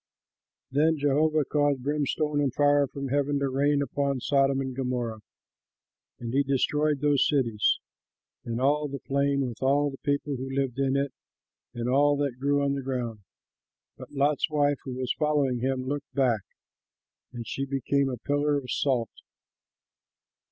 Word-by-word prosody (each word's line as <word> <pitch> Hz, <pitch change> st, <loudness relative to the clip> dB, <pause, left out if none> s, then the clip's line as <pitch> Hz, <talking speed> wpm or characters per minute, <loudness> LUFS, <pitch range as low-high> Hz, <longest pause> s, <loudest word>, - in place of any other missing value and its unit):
Then 155 Hz, +4 st, +3 dB
Jehovah 150 Hz, +1 st, +2 dB
caused 145 Hz, -3 st, +1 dB
brimstone 150 Hz, +1 st, 0 dB
and 140 Hz, -2 st, +1 dB
fire 145 Hz, +1 st, +3 dB
from 140 Hz, 0 st, -6 dB
heaven 145 Hz, +1 st, +1 dB
to 140 Hz, -1 st, 0 dB
rain 140 Hz, +2 st, +2 dB
upon 140 Hz, -1 st, -1 dB
Sodom 135 Hz, +1 st, +2 dB
and 130 Hz, -1 st, -3 dB
Gomorrah, 125 Hz, -4 st, -2 dB, 1.0 s
and 120 Hz, 0 st, -6 dB
he 140 Hz, -, +4 dB
destroyed 145 Hz, +1 st, +1 dB
those 145 Hz, -2 st, +3 dB
cities 115 Hz, -8 st, +2 dB, 0.7 s
and 115 Hz, 0 st, -3 dB
all 145 Hz, +3 st, +2 dB
the 140 Hz, 0 st, -5 dB
plain, 140 Hz, 0 st, 0 dB
with 120 Hz, -, -8 dB
all 140 Hz, +2 st, +2 dB
the 135 Hz, -, -10 dB
people 145 Hz, -1 st, -1 dB
who 130 Hz, +1 st, -5 dB
lived 135 Hz, -2 st, -1 dB
in 135 Hz, 0 st, +2 dB
it 140 Hz, -1 st, -1 dB, 0.6 s
and 120 Hz, 0 st, -3 dB
all 145 Hz, +3 st, +3 dB
that 140 Hz, -3 st, -2 dB
grew 140 Hz, +1 st, +1 dB
on 140 Hz, 0 st, +1 dB
the 140 Hz, -, -2 dB
ground. 125 Hz, -4 st, -3 dB, 0.8 s
But -, -, -11 dB
Lot's 145 Hz, +2 st, +1 dB
wife, 145 Hz, -2 st, +1 dB
who 130 Hz, -2 st, -5 dB
was 130 Hz, -1 st, -1 dB
following 145 Hz, -5 st, +1 dB
him, 130 Hz, +1 st, -1 dB
looked 140 Hz, +1 st, -5 dB
back, 125 Hz, -6 st, +2 dB, 0.9 s
and 120 Hz, -2 st, -7 dB
she 135 Hz, -, -3 dB
became 140 Hz, +1 st, 0 dB
a 125 Hz, -, -4 dB
pillar 145 Hz, +2 st, 0 dB
of 130 Hz, -3 st, -5 dB
salt. 125 Hz, -5 st, 0 dB
140 Hz, 160 wpm, -27 LUFS, 130-145 Hz, 1.0 s, he